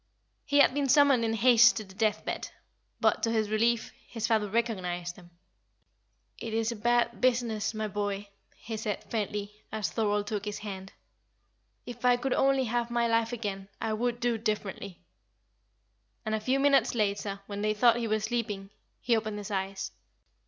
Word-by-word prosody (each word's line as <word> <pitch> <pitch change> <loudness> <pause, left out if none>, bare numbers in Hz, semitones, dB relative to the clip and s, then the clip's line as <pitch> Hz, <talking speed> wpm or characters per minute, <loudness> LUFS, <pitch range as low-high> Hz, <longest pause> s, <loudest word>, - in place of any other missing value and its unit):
He 285 - +1
had 255 - +5
been 285 -1 0
summoned 280 -4 +5
in 225 0 0
haste 235 +1 +6
to 215 - -3
the 190 -2 -15
death 215 +1 0
bed; - - -3 0.5
but, - - +2
to 230 - +1
his 220 -2 0
relief, 230 +2 +1 0.2
his 225 -2 -3
father 220 -3 +1
recognised 180 -6 -2
him. 175 -2 -15 1.1
"It 225 -1 -4
is 225 +1 +1
a - - -4
bad 235 +2 +1
business, 235 -4 +1
my 215 0 -2
boy," 205 0 -3 0.3
he 225 -1 -6
said, 210 -2 -3
faintly, 210 -2 -2 0.2
as 215 -3 -2
Thorold 210 -2 0
took 205 -1 -3
his 210 -1 -3
hand. 195 -2 -7 0.9
"If 245 0 -9
I 245 -1 +5
could 260 +1 -1
only 270 -1 +3
have 240 0 -1
my 235 0 +1
life 230 0 +1
again, 200 -4 -4
I 220 - -1
would 240 +2 -1
do 240 -2 0
differently;" 205 -4 -3 1.3
and 215 - -1
a 220 - +1
few 255 +5 +1
minutes 280 -2 +3
later, 200 -2 -1
when 200 0 -5
they 215 0 +1
thought 235 +2 +5
he 235 -1 -2
was 215 -1 0
sleeping, 215 -4 -3 0.3
he 240 -2 +2
opened 215 -1 -2
his 205 0 -6
eyes. 195 0 -3
220 Hz, 175 wpm, -29 LUFS, 205-235 Hz, 1.3 s, haste